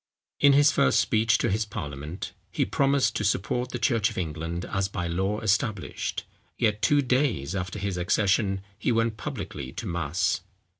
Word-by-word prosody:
In 140 -1 +6
his 145 +1 +6
first 65 - +3
speech 115 +3 +3
to 120 - 0
his 110 +3 +1
parliament, 75 -4 -6 0.2
he - - +1
promised 140 -1 +2
to - - -2
support 110 +5 0
the - - -3
church 115 -4 +2
of 110 - -9
England 85 +1 -3
as 95 -1 -1
by 95 -2 -4
law 95 +5 -1
established; 110 -2 -1 0.3
yet, 105 -1 +1
two 145 +8 +4
days 125 - 0
after 90 +1 -3
his 100 -2 -2
accession, 95 +1 +1 0.2
he 120 - +1
went 115 -1 +1
publicly 70 -9 -5
to 115 - -6
mass. 90 +1 0
100 Hz, 165 wpm, -26 LUFS, 90-115 Hz, 0.3 s, In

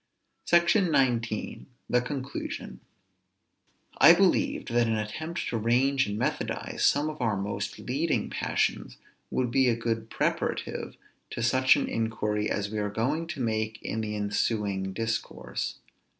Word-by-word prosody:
SECTION 175 +4 +4
XIX. 120 -8 0 0.2
THE 125 - +2
CONCLUSION. 135 +1 -5 1.2
I 165 - +10
believed 275 - +2
that 120 -1 +3
an 110 -1 +1
attempt 155 +11 -4
to 115 - -1
range 130 +4 +2
and 105 0 -3
methodize - - -2
some 145 +1 +3
of 155 -3 -5
our 110 -4 +1
most 100 +1 -3
leading - - -1
passions - - -1 0.3
would 125 -2 -1
be 130 +1 +4
a 115 - +2
good 115 -1 -2
preparative - - -2 0.3
to 120 - -4
such 130 +3 +5
an 140 - -1
inquiry 105 -2 -1
as 100 0 -2
we 110 - -2
are 105 0 -1
going 140 +10 -1
to 160 -6 -5
make 110 -1 -1
in 110 - -2
the 105 -1 -3
ensuing 100 -2 -1
discourse. 110 +2 -3
115 Hz, 140 wpm, -28 LUFS, 110-140 Hz, 1.2 s, I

